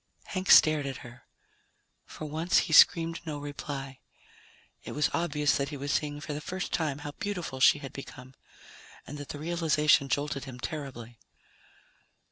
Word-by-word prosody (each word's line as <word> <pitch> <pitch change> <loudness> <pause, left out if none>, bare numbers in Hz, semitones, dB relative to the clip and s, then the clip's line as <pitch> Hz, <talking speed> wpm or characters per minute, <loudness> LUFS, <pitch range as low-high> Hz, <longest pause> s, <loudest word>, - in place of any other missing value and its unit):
Hank 185 0 -5
stared 155 -3 +6
at 135 -3 -7
her. 120 +1 -14 0.8
For 155 - -8
once 160 +4 0
he 160 - -4
screamed 165 +1 +6
no 155 -3 -5
reply. 140 -2 -6 0.8
It - - -7
was 150 - +1
obvious 150 -4 +1
that 140 0 -2
he 145 - -6
was 140 +1 -3
seeing 145 -1 -1
for 150 - -6
the 150 - -5
first 185 +3 -5
time 155 -5 -1
how 145 - -4
beautiful 180 -10 -4
she 135 - +6
had 140 -2 -9
become, 130 -1 -10 0.7
and 145 - -8
that 145 - -8
the - - -5
realization 150 -3 +2
jolted 145 -1 -2
him 130 -2 -9
terribly. 125 -7 -7
145 Hz, 160 wpm, -29 LUFS, 140-160 Hz, 0.8 s, stared